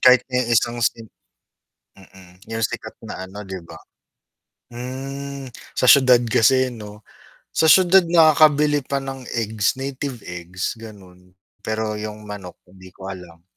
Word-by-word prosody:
kahit 125 0 +6
ni 125 - +2 0.2
isang 120 +1 0
sim 115 0 0 0.9
Mm, 95 -1 -18
yung 115 0 -4
sikat 105 - -3
na 95 - -7
ano 100 +2 -9
'di 95 -1 -7
ba? 80 - -11 1.0
Hmm, 135 +2 -6 0.3
sa - - 0
siyudad 130 -3 +7
kasi 130 +4 +4
'no? 105 -2 -10 0.5
Sa 160 - +2
siyudad 185 +3 +7
nakakabili 150 -3 +5
pa 140 - -2
ng 135 -1 -7
eggs, 110 0 0
native 135 -2 -5
eggs 90 +1 -5
gano'n. 95 -5 -14 0.3
Pero 110 0 -2
yung 105 0 -7
manok 100 -4 -9
hindi 95 0 -15
ko 95 0 -8
alam. 85 -3 -12
115 Hz, 135 wpm, -21 LUFS, 95-135 Hz, 1.0 s, siyudad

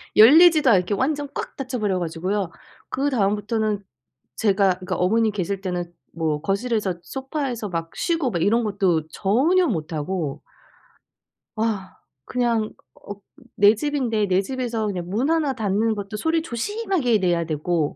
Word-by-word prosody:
열리지도 310 +5 +7
않게 190 -2 +3
완전 285 +7 0
꽉 - - -5
닫혀버려 235 -8 -2
가지고요. 175 +3 -2 0.4
그다음부터는 215 -5 0 0.5
제가 195 -3 +2
그니까 185 - -3
어머니 220 +4 +2
계실 195 -1 -3
때는 180 -2 -3 0.2
뭐 155 -3 -1
거실에서 200 +1 -1
소파에서 265 -5 -4
막 165 -1 -4
쉬고 330 -7 0
막 170 - -2
이런 230 +6 +3
것도 190 -7 0
전혀 280 - +2
못하고 160 - -3 1.1
아 215 -4 -2 0.3
그냥 235 -3 0 0.2
어 205 - -9 0.4
내 205 +1 +6
집인데 240 -4 0
내 185 0 +3
집에서 240 -1 -3
그냥 180 -4 -4
문 235 +9 0
1 320 -4 +1
닫는 220 0 0
것도 205 +1 -5
소리 320 +7 +1
조심하게 325 - 0
내야 175 -3 +1
되고 155 0 -1
210 Hz, 285 characters per minute, -23 LUFS, 185-255 Hz, 1.1 s, 열리지도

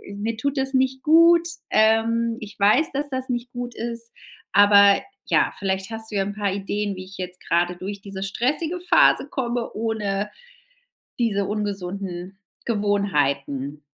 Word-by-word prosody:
mir 220 +2 -3
tut 280 +4 -2
das 265 0 -1
nicht 260 0 +1
gut. 335 +2 +6 0.2
Ähm, 225 +1 +2
ich 215 -2 -10
weiß, 215 +10 +4
dass 285 +1 -2
das 260 0 -3
nicht 245 0 -3
gut 245 0 -6
ist, 230 0 -5 0.4
aber, 200 -1 +6 0.2
ja, - - +2
vielleicht 190 +1 -2
hast 220 0 -5
du 210 - -5
ja 195 - +2
'n 200 - -4
paar 200 -2 -1
Ideen, 200 0 -3
wie 185 - -7
ich 195 +1 -13
jetzt 180 -1 -7
gerade 175 +1 +1
durch 195 +2 -6
diese 195 -1 -6
stressige 300 - -1
Phase 365 +8 +4
komme 240 -3 -2
ohne 210 -2 -2 0.9
diese 205 -4 +1
ungesunden 195 -2 -4 0.3
Gewohnheiten. 150 - -1
210 Hz, 150 wpm, -23 LUFS, 195-240 Hz, 0.9 s, gut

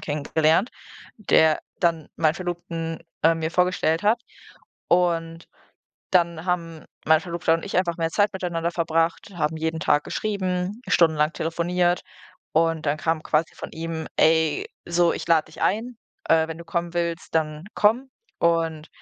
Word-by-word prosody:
kennengelernt, 160 - +1 0.5
der 160 -7 +3 0.2
dann 165 -3 0
meinen 160 -1 +2
Verlobten, 170 -2 -4 0.2
äh, 165 +1 +5
mir 160 0 -2
vorgestellt 180 -2 +1
hat. 215 +3 +3 0.7
Und 165 -2 +1 0.7
dann 170 -3 +2
haben 170 -3 -2 0.2
mein 160 0 +5
Verlobter 170 -1 -1
und 165 - -3
ich 200 - -3
einfach 175 -2 0
mehr 165 -1 0
Zeit 205 +4 +2
miteinander 175 -3 -2
verbracht, 165 +1 0
haben 160 -1 -1
jeden 160 0 -2
Tag 145 -1 +3
geschrieben, 190 0 -2
stundenlang 160 -4 +3
telefoniert 175 +2 0 0.5
und 165 -1 +1
dann 145 +1 +1
kam 160 +1 -1
quasi 155 +1 0
von - - -8
ihm: 160 -1 -5
„Ey, 160 -1 +3 0.2
so, 170 0 +3
ich - - -5
lade 165 -2 +4
dich - - -14
ein, 230 +3 0 0.3
äh, 160 0 +4
wenn 160 - -5
du 170 - -9
kommen 170 0 -3
willst, 170 -1 -3
dann 155 0 -1
komm.” 240 +6 +2 0.3
Und 165 -2 0
165 Hz, 150 wpm, -24 LUFS, 160-175 Hz, 0.7 s, äh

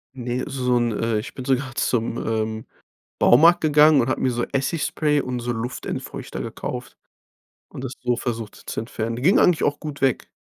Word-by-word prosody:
Ne, 125 0 -3
so 125 -3 0
'n, 120 -1 +1
äh 115 -1 0
ich 105 - -7
bin 130 - -7
sogar 135 -1 0
zum, 115 -1 0
ähm, 110 0 -2 0.5
Baumarkt 165 +8 +6
gegangen 150 -1 +5
und 120 - 0
habe 130 - -1
mir 130 - +2
so 120 0 -1
Essigspray 150 +1 0
und 125 -2 -3
so 120 +1 -2
Luftentfeuchter 120 +2 -5
gekauft - - -6 0.7
und - - -8
das 130 0 -4
so 125 -1 0
versucht 115 -4 -4
zu - - -2
entfernen. 115 0 -4
Ging 180 +9 +5
eigentlich 175 -3 +4
auch 145 - +1
gut 150 -2 -7
weg. 135 -3 +1
125 Hz, 180 wpm, -23 LUFS, 115-145 Hz, 0.7 s, Baumarkt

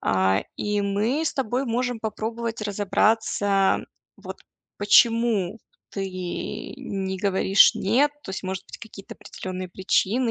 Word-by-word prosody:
А, 95 +1 +2
и 210 0 -1
мы 210 +9 0
с - - -1
тобой 260 0 -1
можем 245 0 -1
попробовать 225 +1 -4
разобраться, 205 -1 +1 0.4
вот - - -9 0.4
почему 225 -2 +3 0.3
ты 195 -1 -3 0.7
не 195 -7 -4
говоришь 195 0 +4
"нет". 255 +9 +2
То - - -8
есть, 190 - -5
может 190 0 -4
быть, - - -11
какие-то 215 -3 -11
определенные 185 0 -7
причины 200 +6 +1
205 Hz, 120 wpm, -24 LUFS, 190-230 Hz, 0.7 s, говоришь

